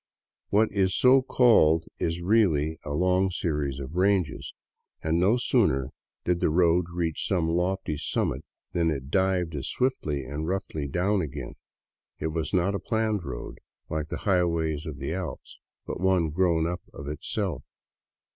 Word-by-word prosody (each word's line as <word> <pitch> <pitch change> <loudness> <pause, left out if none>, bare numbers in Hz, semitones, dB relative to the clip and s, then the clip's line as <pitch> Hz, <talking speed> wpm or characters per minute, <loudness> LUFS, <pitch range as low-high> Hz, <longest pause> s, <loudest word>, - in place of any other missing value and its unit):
What 110 +2 +3
is 95 -2 +1
so 130 +1 +6
called 95 - +4
is 85 +1 -1
really 85 -7 +2
a - - -7
long 90 +5 +2
series 75 -6 -2
of 70 +3 -7
ranges, 95 -3 +1 0.5
and 80 +1 +1
no 100 +7 +4
sooner 65 - +2 0.3
did 90 -1 +1
the - - +2
road 85 +1 +3
reach 85 -2 -1
some 90 -4 +1
lofty 90 -1 -1
summit 75 - -1 0.3
than 85 -1 +2
it 70 -2 -4
dived 95 -3 +1
as 70 -3 -4
swiftly 80 - -1
and 75 +4 -4
roughly 90 -6 -3
down 95 +7 +1
again. 75 -4 -5 0.6
It 80 - -2
was 80 -1 -2
not 95 +1 +2
a 100 - -1
planned 110 -4 -1
road, 65 -5 -7 0.3
like 80 0 -2
the - - -3
highways 85 -5 +1
of 75 -3 -6
the 70 +4 -3
Alps, 90 -6 -6 0.3
but - - -5
one 90 -4 +2
grown 85 -1 +2
up 90 +1 -3
of 70 - -9
itself. 75 0 -3
85 Hz, 155 wpm, -27 LUFS, 75-95 Hz, 0.6 s, so